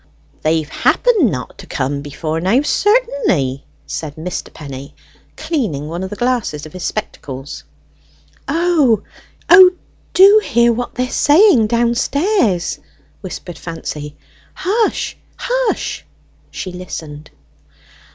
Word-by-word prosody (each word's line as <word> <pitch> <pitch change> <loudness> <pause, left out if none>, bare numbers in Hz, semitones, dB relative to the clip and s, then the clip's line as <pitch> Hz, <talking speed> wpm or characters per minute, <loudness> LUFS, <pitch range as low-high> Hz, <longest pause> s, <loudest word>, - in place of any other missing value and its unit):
"They've 155 -1 +1
happened 405 - +2
not 125 - -6
to - - -11
come, 140 +1 -2
before 155 +3 -4
now, 220 - +2
certainly," 415 - +1 0.2
said 145 - -5
Mr. 170 +3 -5
Penny, 140 -2 -9 0.4
cleaning 235 - -2
one 170 +3 -4
of 190 - -4
the 205 - -6
glasses 240 -11 -1
of 155 - -12
his 185 -2 -7
spectacles. 140 - -5 0.8
"O, 300 - +2 1.1
do 400 +3 +8
hear 235 0 +3
what 245 +1 -4
they 250 - 0
are 250 - -8
saying 295 - +5
downstairs," 235 - +1 0.4
whispered 180 -2 -8
Fancy. 150 -3 -6 0.4
"Hush, 425 +4 0 0.2
hush!" - - -1 0.5
She 185 - -6
listened. 155 -4 -8
205 Hz, 110 wpm, -17 LUFS, -, 1.1 s, do